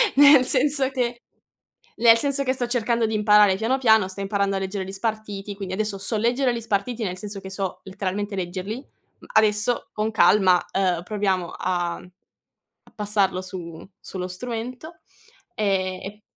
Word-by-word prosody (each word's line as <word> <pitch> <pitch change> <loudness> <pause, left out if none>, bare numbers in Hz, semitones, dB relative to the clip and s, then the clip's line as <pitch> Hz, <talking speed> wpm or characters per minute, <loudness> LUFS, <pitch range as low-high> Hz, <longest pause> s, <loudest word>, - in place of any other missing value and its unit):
nel 285 -2 +7
senso 275 0 +2
che 245 -3 -2 0.8
nel 230 -1 +7
senso 280 +3 +1
che 260 0 +1
sto 250 -2 -2
cercando 235 -1 0
di 220 - -1
imparare 210 -2 +5
piano, 225 +6 0
piano, 220 -6 +4
sto 190 +1 -8
imparando 200 0 0
a - - 0
leggere 190 0 -4
gli 195 - -7
spartiti, 205 -1 -4
quindi 195 -2 -6
adesso 210 -1 -2
so 210 +3 -2
leggere 245 +4 +1
li 235 -1 -4
spartiti 225 +2 -2
nel 185 -2 -4
senso 205 0 -6
che 190 - -8
so 190 -1 -4
letteralmente 200 +1 -4
leggerli. 185 +4 -4
Mhmm, 265 - -17
adesso 215 +2 +2
con 215 +1 -1
calma, 195 -4 +4
ehm, 180 -3 +1
proviamo, 195 -1 -1
uhm, - - -10
a 175 0 -2 0.9
passarlo 200 -3 0
su 175 -2 -8
sullo 180 -1 -6
strumento 245 - -6 0.6
ehm, 185 -3 0
e 210 +2 -8
210 Hz, 160 wpm, -23 LUFS, 190-235 Hz, 0.9 s, nel